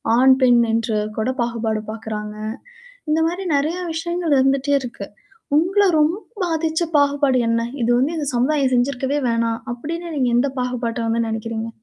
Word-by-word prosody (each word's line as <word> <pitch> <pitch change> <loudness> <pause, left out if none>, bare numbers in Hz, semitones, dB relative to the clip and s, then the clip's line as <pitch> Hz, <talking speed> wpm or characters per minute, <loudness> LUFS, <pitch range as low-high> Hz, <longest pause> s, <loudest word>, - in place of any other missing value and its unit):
ஆண், 260 +2 +6
பெண் 245 -2 +5
என்று 225 -1 0 0.2
கூட 220 +3 0
பாகுபாடு 225 -2 -1
பாக்குறாங்க. 215 -1 -6 0.7
இந்த 310 - +2
மாரி 355 +3 -3
நிறைய 310 +5 0 0.2
விஷயங்கள் 340 -1 -1
இருந்துட்டே 270 +1 +2
இருக்கு. 235 -6 -7 0.5
உங்கள 380 +6 +3 0.2
ரொம்ப 310 +4 +2 0.3
பாதிச்ச 320 0 -1 0.2
பாகுபாடு 285 -2 +3
என்ன? 230 0 +1 0.2
"இத 230 - +1
வந்து 285 +7 +1
இந்த 295 -3 -2
சமுதாயம் 265 +1 +2
செஞ்சிருக்கவே 265 +2 0
வேணாம்!" 230 0 0
அப்படின்னு, 330 +8 -5
நீங்க 255 -3 +2
எந்த 270 +3 +2
பாகுபாட்டை 245 -2 -2
வந்து 230 0 0
நினைக்கிறீங்க? 225 0 -4
255 Hz, 145 wpm, -21 LUFS, 230-305 Hz, 0.7 s, ஆண்